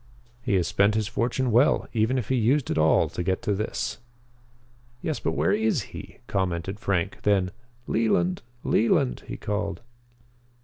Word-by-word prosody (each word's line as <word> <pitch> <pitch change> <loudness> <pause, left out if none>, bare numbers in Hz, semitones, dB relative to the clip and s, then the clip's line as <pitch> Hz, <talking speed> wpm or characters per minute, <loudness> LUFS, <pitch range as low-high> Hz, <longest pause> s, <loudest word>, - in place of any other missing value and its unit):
He 100 - 0
has 90 -3 +2
spent 100 +2 +3
his 110 -2 0
fortune 120 +3 0
well, 120 +6 +4
even 115 +3 +2
if 120 -6 -3
he 130 - +2
used 125 +4 +2
it - - -1
all 80 0 +4
to - - -4
get 95 +5 -1
to 105 -4 +1
this." 105 +2 -3 1.0
"Yes, 155 - -1
but - - -1
where - - +1
is 210 - +1
he?" - - -9
commented 95 0 -2
Frank. 90 -1 -1
Then: 95 -3 +2 0.3
"Leland! 95 -5 +1 0.2
Leland!" 65 - +2
he - - -5
called. 105 -1 -3
105 Hz, 160 wpm, -26 LUFS, 95-120 Hz, 1.0 s, well